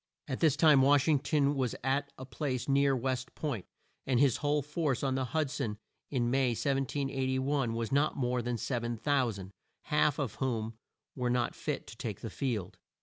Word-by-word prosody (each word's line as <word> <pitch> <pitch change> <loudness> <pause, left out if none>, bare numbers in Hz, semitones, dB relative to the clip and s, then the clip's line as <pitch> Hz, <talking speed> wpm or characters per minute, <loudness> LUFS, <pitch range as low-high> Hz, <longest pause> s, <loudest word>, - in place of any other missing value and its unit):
At 130 -3 -3
this 155 -5 +4
time 150 -5 +6
Wash 140 +1 +4
ing 150 -3 +4
ton 145 0 +2
was 130 -4 -1
at 140 +2 0
a 130 - -7
place 130 -2 -3
near 140 0 +3
West 130 0 -2
Point, 135 - -3 0.4
and 130 -3 +2
his 140 -4 +4
whole 145 -1 +1
force 150 -3 -1
on 135 -1 +1
the 130 0 0
Hud 140 +2 -1
son, 125 -8 -3 0.3
in 120 -3 0
May 130 -2 +2
1781, 135 -1 0
was 115 -1 -2
not 145 +3 +2
more 125 -2 0
than 120 0 -2
7,000; 120 -4 -1 0.3
half 150 -2 +2
of 135 -8 -2
whom 115 -4 -1 0.4
were 125 -2 -1
not 120 0 +1
fit - - -4
to - - -11
take - - -5
the - - -5
field. 110 -9 -3
135 Hz, 180 wpm, -31 LUFS, 120-145 Hz, 0.4 s, time